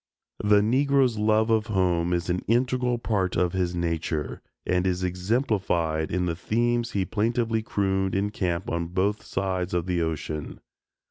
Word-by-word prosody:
The 105 Hz, 0 st, +5 dB
Negro's 130 Hz, 0 st, +2 dB
love 110 Hz, +1 st, +3 dB
of 110 Hz, -1 st, +2 dB
home 90 Hz, -4 st, +1 dB
is 85 Hz, -1 st, 0 dB
an 90 Hz, 0 st, 0 dB
integral 125 Hz, +1 st, +1 dB
part 100 Hz, -6 st, -1 dB
of 90 Hz, 0 st, +1 dB
his 90 Hz, -2 st, -1 dB
nature, 85 Hz, -3 st, -2 dB, 0.2 s
and 90 Hz, +1 st, +1 dB
is 90 Hz, 0 st, -1 dB
exemplified 90 Hz, -, 0 dB
in 90 Hz, +1 st, 0 dB
the 85 Hz, -2 st, -1 dB
themes 120 Hz, +5 st, 0 dB
he 95 Hz, -2 st, 0 dB
plaintively 115 Hz, +1 st, 0 dB
crooned 95 Hz, -3 st, 0 dB
in 100 Hz, +1 st, 0 dB
camp 90 Hz, -3 st, -2 dB
on 85 Hz, 0 st, -2 dB
both 95 Hz, +4 st, 0 dB
sides 95 Hz, -2 st, -2 dB
of 85 Hz, -1 st, 0 dB
the 90 Hz, -2 st, 0 dB
ocean. 75 Hz, -2 st, -4 dB
95 Hz, 155 wpm, -26 LUFS, 90-110 Hz, 0.2 s, The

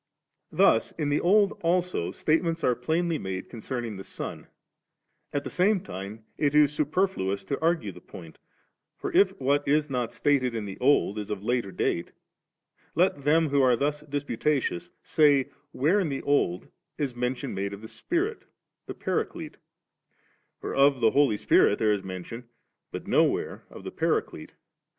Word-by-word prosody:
Thus 110 Hz, -, +3 dB
in 150 Hz, -3 st, -2 dB
the 145 Hz, -, +2 dB
Old 200 Hz, +3 st, +4 dB
also, 175 Hz, -, 0 dB
statements 165 Hz, +1 st, 0 dB
are 125 Hz, -, +3 dB
plainly 160 Hz, +6 st, -1 dB
made 95 Hz, -1 st, -5 dB
concerning 120 Hz, -2 st, -5 dB
the 95 Hz, -, -7 dB
Son; -, -, -7 dB, 0.8 s
at 145 Hz, -, -2 dB
the -, -, -5 dB
same 195 Hz, +3 st, +3 dB
time 100 Hz, -, -8 dB
it 145 Hz, -1 st, +1 dB
is 150 Hz, -1 st, +5 dB
superfluous 150 Hz, -, 0 dB
to 140 Hz, -, -4 dB
argue 165 Hz, 0 st, +1 dB
the -, -, -14 dB
point; -, -, -12 dB, 0.6 s
for 395 Hz, -, -5 dB
if 390 Hz, +4 st, +4 dB
what 140 Hz, +2 st, +1 dB
is 150 Hz, 0 st, +2 dB
not 125 Hz, -3 st, -1 dB
stated 130 Hz, -5 st, +1 dB
in 110 Hz, -2 st, -3 dB
the 95 Hz, -1 st, -8 dB
Oki 125 Hz, -6 st, +3 dB
is 105 Hz, -, -9 dB
of 100 Hz, -2 st, -4 dB
later 120 Hz, -3 st, -1 dB
date, 85 Hz, -, -2 dB, 0.8 s
let 160 Hz, -4 st, +1 dB
them 160 Hz, +1 st, +3 dB
who 140 Hz, 0 st, +3 dB
are 125 Hz, -2 st, +5 dB
thus 145 Hz, +4 st, -1 dB
dis 145 Hz, -1 st, -4 dB
putatious, 135 Hz, -, -1 dB
say 145 Hz, -3 st, +3 dB, 0.2 s
where 160 Hz, +10 st, +2 dB
in 180 Hz, -6 st, 0 dB
the 135 Hz, -, -4 dB
Old 95 Hz, -11 st, 0 dB, 0.3 s
is 135 Hz, -5 st, -2 dB
mention 125 Hz, +2 st, -2 dB
made 100 Hz, +1 st, -3 dB
of 100 Hz, +2 st, -9 dB
the -, -, -7 dB
Spirit, 370 Hz, -, -2 dB, 0.4 s
the -, -, -6 dB
Paraclete? -, -, -3 dB, 1.0 s
for -, -, -5 dB
of 140 Hz, -1 st, +4 dB
the 115 Hz, -2 st, +4 dB
Holy 140 Hz, -7 st, +3 dB
Spirit 100 Hz, -, +4 dB
there 105 Hz, -1 st, +2 dB
is 100 Hz, -, -2 dB
mention, 95 Hz, +6 st, -8 dB, 0.4 s
but -, -, -6 dB
nowhere -, -, +1 dB
of -, -, -11 dB
the -, -, -6 dB
Paraclete. -, -, -2 dB
140 Hz, 165 wpm, -27 LUFS, 110-155 Hz, 1.0 s, is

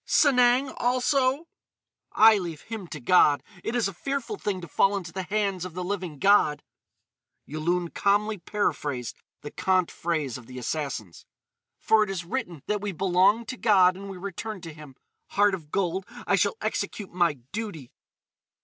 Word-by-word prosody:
"Sanang, 260 Hz, -1 st, +4 dB
also?" 255 Hz, +4 st, +1 dB, 0.6 s
"I 220 Hz, -1 st, +6 dB
leave 170 Hz, -5 st, -6 dB
him 220 Hz, -5 st, -7 dB
to 155 Hz, -, -7 dB
God. 145 Hz, +1 st, +4 dB, 0.2 s
It 230 Hz, -, -2 dB
is 235 Hz, -4 st, +2 dB
a 195 Hz, -, -6 dB
fearful 275 Hz, -, -3 dB
thing 205 Hz, -, -3 dB
to 170 Hz, -, -8 dB
fall 195 Hz, +6 st, +2 dB
into 175 Hz, -4 st, -7 dB
the 190 Hz, -, -3 dB
hands 195 Hz, -1 st, -1 dB
of 180 Hz, -2 st, -7 dB
the 180 Hz, -, -3 dB
living 180 Hz, -5 st, -4 dB
God!" 195 Hz, -4 st, +3 dB, 0.8 s
Yulun 170 Hz, +4 st, -1 dB
calmly 205 Hz, +1 st, +1 dB
paraphrased 145 Hz, -, -2 dB, 0.3 s
the 145 Hz, -, -8 dB
cant 185 Hz, -2 st, +1 dB
phrase 155 Hz, -7 st, -2 dB
of 120 Hz, -, -16 dB
the 130 Hz, 0 st, -10 dB
Assassins: 125 Hz, -, -4 dB, 0.5 s
"For 220 Hz, -1 st, +3 dB
it 210 Hz, -, -4 dB
is 185 Hz, -3 st, -4 dB
written 175 Hz, -, -4 dB
that 210 Hz, -1 st, -1 dB
we 205 Hz, -1 st, -2 dB
belong 190 Hz, +5 st, +3 dB
to 255 Hz, +3 st, -6 dB
God 190 Hz, -6 st, +4 dB
and 195 Hz, +1 st, -8 dB
we 195 Hz, -, -7 dB
return 200 Hz, +3 st, -6 dB
to 165 Hz, -2 st, -8 dB
Him. 150 Hz, -3 st, -13 dB, 0.3 s
Heart 205 Hz, 0 st, +3 dB
of 160 Hz, -6 st, -6 dB
gold, 190 Hz, +2 st, -1 dB, 0.2 s
I -, -, +3 dB
shall 450 Hz, -, +1 dB
execute 205 Hz, -3 st, -3 dB
my 175 Hz, -3 st, +2 dB, 0.2 s
duty!" 200 Hz, -, -6 dB
190 Hz, 165 wpm, -26 LUFS, 165-215 Hz, 0.8 s, I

